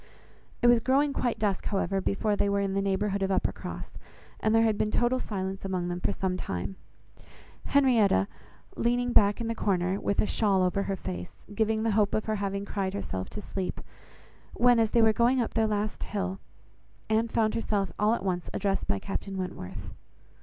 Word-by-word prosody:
It -, -, +6 dB
was 240 Hz, -1 st, +6 dB
growing 275 Hz, +4 st, +2 dB
quite 245 Hz, -3 st, -1 dB
dusk, 200 Hz, -3 st, -1 dB
however, 195 Hz, -1 st, 0 dB
before 205 Hz, +2 st, 0 dB
they 200 Hz, -, +1 dB
were 200 Hz, 0 st, +1 dB
in 195 Hz, -1 st, -1 dB
the 195 Hz, -, +1 dB
neighbourhood 200 Hz, +1 st, 0 dB
of 195 Hz, -, +1 dB
Uppercross, 190 Hz, -, -2 dB, 0.5 s
and 215 Hz, +1 st, +2 dB
there 225 Hz, -, +5 dB
had 220 Hz, -2 st, +3 dB
been 210 Hz, -, 0 dB
total 240 Hz, +3 st, +1 dB
silence 195 Hz, -4 st, -4 dB
among 185 Hz, -2 st, -2 dB
them 175 Hz, 0 st, -3 dB
for -, -, 0 dB
some 185 Hz, -1 st, -2 dB
time, 95 Hz, -, -4 dB, 0.9 s
Henrietta 230 Hz, -, +4 dB, 0.5 s
leaning 245 Hz, +1 st, +1 dB
back 205 Hz, +1 st, +5 dB
in 230 Hz, -, -2 dB
the 230 Hz, -, 0 dB
corner, 190 Hz, -3 st, 0 dB
with 200 Hz, -, -1 dB
a -, -, +4 dB
shawl 200 Hz, -4 st, +2 dB
over 185 Hz, +2 st, +1 dB
her 195 Hz, -, 0 dB
face, 90 Hz, -, -7 dB
giving 220 Hz, +1 st, +1 dB
the 225 Hz, -, +2 dB
hope 205 Hz, -1 st, +2 dB
of 215 Hz, -, -1 dB
her 215 Hz, -1 st, -1 dB
having 200 Hz, 0 st, -2 dB
cried 195 Hz, -1 st, -2 dB
herself 95 Hz, -, -4 dB
to 210 Hz, -, -6 dB
sleep; 190 Hz, -2 st, -4 dB, 0.8 s
when, 245 Hz, -1 st, +5 dB
as 225 Hz, -1 st, +3 dB
they 230 Hz, +1 st, +4 dB
were 220 Hz, 0 st, +5 dB
going 240 Hz, +4 st, +3 dB
up 235 Hz, -, -1 dB
their 225 Hz, -1 st, +2 dB
last 210 Hz, 0 st, -2 dB
hill, 195 Hz, -2 st, -3 dB, 0.7 s
Anne 220 Hz, +1 st, +2 dB
found 220 Hz, -1 st, +1 dB
herself 205 Hz, -4 st, -1 dB
all 215 Hz, +2 st, +3 dB
at 195 Hz, -, -6 dB
once 180 Hz, -2 st, -2 dB
addressed 195 Hz, -1 st, -1 dB
by 100 Hz, -, +1 dB
Captain 195 Hz, -, -5 dB
Wentworth. 180 Hz, -, -6 dB
205 Hz, 195 wpm, -28 LUFS, 190-225 Hz, 0.9 s, It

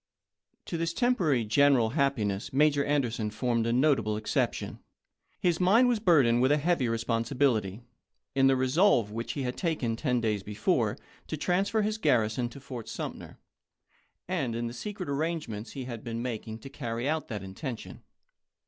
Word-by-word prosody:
To 170 Hz, -, -4 dB
this 165 Hz, 0 st, -1 dB
temporary 175 Hz, -, +2 dB
general 125 Hz, 0 st, +4 dB
happiness 120 Hz, -8 st, 0 dB
Major 145 Hz, +1 st, +3 dB
An 145 Hz, -1 st, +2 dB
derson 110 Hz, -3 st, -3 dB
formed 115 Hz, +1 st, 0 dB
a -, -, +1 dB
notable 125 Hz, -5 st, +2 dB
exception. 110 Hz, -, -2 dB, 0.6 s
His 175 Hz, -2 st, +1 dB
mind 210 Hz, +8 st, +5 dB
was 240 Hz, -3 st, +1 dB
burdened 140 Hz, -, +4 dB
with 130 Hz, +2 st, +3 dB
a 150 Hz, -, +4 dB
heavy 150 Hz, -5 st, +1 dB
responsibility 115 Hz, -2 st, 0 dB, 0.5 s
in 135 Hz, 0 st, +4 dB
the 135 Hz, -, +4 dB
resolve 130 Hz, -, +3 dB
which 115 Hz, +2 st, -4 dB
he 140 Hz, -, -3 dB
had 125 Hz, 0 st, -2 dB
taken 155 Hz, -10 st, -1 dB
ten 125 Hz, 0 st, 0 dB
days 110 Hz, -3 st, 0 dB
before 105 Hz, +1 st, 0 dB, 0.3 s
to -, -, -4 dB
transfer 200 Hz, +4 st, +1 dB
his 215 Hz, +1 st, -1 dB
garrison 120 Hz, -, +1 dB
to 130 Hz, -, -11 dB
Fort 125 Hz, -4 st, -8 dB
Sumter, -, -, -6 dB, 0.9 s
and 120 Hz, -4 st, -1 dB
in 120 Hz, +1 st, -2 dB
the 115 Hz, -, -4 dB
secret 195 Hz, -, -6 dB
arrange 155 Hz, +2 st, -1 dB
ments 110 Hz, 0 st, -7 dB
he 135 Hz, -, -5 dB
had 120 Hz, -3 st, -7 dB
been 115 Hz, -1 st, -4 dB
making 110 Hz, -2 st, -4 dB
to 135 Hz, -, -9 dB
carry 120 Hz, -2 st, -3 dB
out 155 Hz, +1 st, -1 dB
that 105 Hz, -4 st, -5 dB
inten 110 Hz, +6 st, -5 dB
tion. -, -, -11 dB
130 Hz, 170 wpm, -29 LUFS, 115-155 Hz, 0.9 s, mind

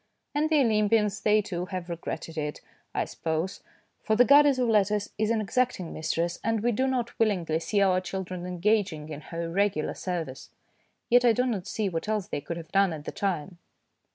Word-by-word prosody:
And 300 Hz, +2 st, +1 dB
the 310 Hz, -3 st, +4 dB
Olympians 210 Hz, -3 st, +2 dB
they, 210 Hz, 0 st, +3 dB
too, 180 Hz, -3 st, -4 dB
have 185 Hz, -2 st, -5 dB
regretted 170 Hz, -1 st, -5 dB
it, 150 Hz, -2 st, -3 dB, 0.3 s
I -, -, -1 dB
suppose, 160 Hz, +3 st, -3 dB, 0.4 s
for 220 Hz, -, +1 dB
the 245 Hz, +3 st, +6 dB
goddess 285 Hz, +1 st, +6 dB
of 250 Hz, -1 st, +1 dB
letters 210 Hz, -1 st, +2 dB
is 215 Hz, 0 st, +1 dB
an 225 Hz, -1 st, +1 dB
exacting 225 Hz, -5 st, -1 dB
mistress, 170 Hz, +2 st, -2 dB
and 225 Hz, -1 st, 0 dB
we 240 Hz, -, +3 dB
do 260 Hz, +4 st, +1 dB
not 245 Hz, -3 st, -2 dB
willingly 180 Hz, -8 st, +1 dB
see 200 Hz, +4 st, 0 dB
our 185 Hz, -1 st, +3 dB
children 185 Hz, -1 st, -5 dB
engaging 180 Hz, -4 st, 0 dB
in 150 Hz, -1 st, -6 dB
her 165 Hz, +1 st, -5 dB
irregular 170 Hz, -1 st, 0 dB
service. 165 Hz, -8 st, -5 dB, 0.6 s
Yet 245 Hz, 0 st, +6 dB
I 240 Hz, -2 st, +5 dB
do 250 Hz, +3 st, +1 dB
not 210 Hz, -7 st, -2 dB
see 215 Hz, -2 st, -1 dB
what 170 Hz, +2 st, -3 dB
else 210 Hz, -2 st, -1 dB
they 145 Hz, -, -3 dB
could 170 Hz, -, -5 dB
have 165 Hz, -1 st, -9 dB
done 195 Hz, -3 st, +3 dB
at 150 Hz, -1 st, -8 dB
the -, -, -4 dB
time. 180 Hz, -3 st, -3 dB
195 Hz, 195 wpm, -27 LUFS, 170-220 Hz, 0.6 s, the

